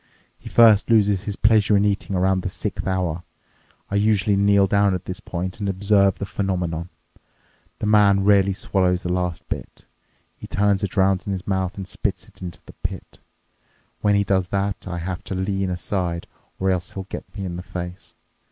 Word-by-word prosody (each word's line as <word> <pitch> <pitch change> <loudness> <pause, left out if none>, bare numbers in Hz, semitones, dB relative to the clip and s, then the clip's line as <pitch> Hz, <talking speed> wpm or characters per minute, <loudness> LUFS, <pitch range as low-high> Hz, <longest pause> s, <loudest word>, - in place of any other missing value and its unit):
He - - -10
first 110 -3 +6
loses 105 -3 +3
his 105 - -3
pleasure 105 -1 +4
in 100 - +3
eating 100 -1 -1
around 95 +1 +2
the - - -3
sixth - - -4
hour. 90 -3 -1 0.7
I 100 - +1
usually 105 0 +2
kneel 100 0 +4
down 100 0 +3
at 90 - -6
this 90 - -5
point 90 +3 -5
and 100 -1 -2
observe 100 0 +3
the 100 - -4
phenomenon. 90 -4 -2 0.9
The - - -4
man 105 -2 +4
rarely 100 -1 +4
swallows 90 -1 0
the 90 - -1
last 90 -1 -2
bit. - - -7 0.5
He - - -10
turns 100 -1 +1
it 100 0 -4
around 95 0 +3
in - - -1
his 95 -2 -4
mouth 95 0 -1
and 95 -2 -6
spits - - -3
it - - -20
into 90 -2 -7
the - - -13
pit. - - -6 0.8
When 105 -1 +3
he 100 - +3
does 95 -2 +1
that, 100 +1 -2
I 90 -1 -4
have 90 +1 -4
to 95 - -4
lean 95 0 -1
aside 90 -1 -2 0.3
or 95 0 +2
else 90 -1 -2
he'll 95 - -5
get 95 - -9
me 100 - -4
in 90 -1 -4
the 90 - -5
face. 90 0 -7
95 Hz, 190 wpm, -22 LUFS, 90-100 Hz, 0.9 s, first